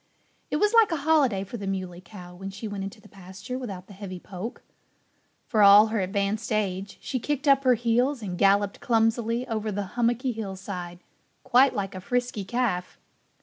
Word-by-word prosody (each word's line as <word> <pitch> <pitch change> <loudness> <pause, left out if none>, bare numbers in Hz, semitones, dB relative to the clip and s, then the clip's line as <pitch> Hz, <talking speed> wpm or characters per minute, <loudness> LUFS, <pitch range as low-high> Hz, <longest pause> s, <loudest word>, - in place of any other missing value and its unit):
It - - -1
was 420 +8 +2
like 455 -5 +6
a - - +1
holiday 275 -12 +3
for 200 +5 -7
the 200 -2 -6
Muley 185 -2 -4
Cow 180 -3 -12
when 195 +2 -7
she 200 +3 -7
went 205 -2 -5
into 195 +2 -7
the - - -17
pasture 195 +6 -8
without 195 -8 -7
the 200 - -14
heavy 190 -2 -7
poke. 195 +5 -8 0.8
For 220 -3 +1
all 205 +2 +8
her 225 - +1
advanced 200 +4 -1
age, 200 -2 -2
she 260 - -3
kicked 290 +3 -2
up 275 -1 +5
her 255 -2 +5
heels 240 +3 +1
and 185 -3 -4
galloped 200 +1 +2
clumsily 230 +1 +1
over 220 -2 -2
the 205 0 -2
hummocky 240 +2 +1
hillside, 190 -5 -6 0.4
quite 260 +1 +4
like 195 -1 -3
a 185 - -7
frisky 245 0 -2
calf. 205 -5 -2
210 Hz, 185 wpm, -26 LUFS, 195-245 Hz, 0.8 s, all